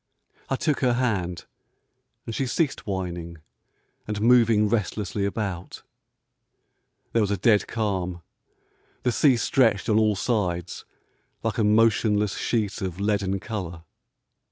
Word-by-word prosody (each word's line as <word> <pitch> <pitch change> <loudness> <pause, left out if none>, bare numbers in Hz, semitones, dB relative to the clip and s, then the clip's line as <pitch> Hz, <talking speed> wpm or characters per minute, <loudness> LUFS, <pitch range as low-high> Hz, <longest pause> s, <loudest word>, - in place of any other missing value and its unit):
I 135 - +1
took 150 +1 0
her 125 -2 +2
hand, 100 -9 -1 0.8
and 115 - -5
she 135 +3 -1
ceased 140 -2 -1
whining 85 -3 -4 0.7
and 105 -1 -3
moving 115 -2 +4
restlessly 105 -2 -1
about. 100 -4 -4 1.3
There 115 - +3
was 105 - +1
a 100 - 0
dead 105 0 +3
calm. 95 -6 -2 0.8
The 125 - +2
sea 125 +3 +4
stretched 115 -3 +2
on 110 0 +4
all 110 -1 +3
sides 90 -3 -2 0.6
like 115 0 -1
a - - +3
motionless 105 -1 +3
sheet 105 -4 -1
of 95 -2 -4
leaden 100 -1 0
colour. 90 -6 -6
105 Hz, 125 wpm, -25 LUFS, 95-115 Hz, 1.3 s, moving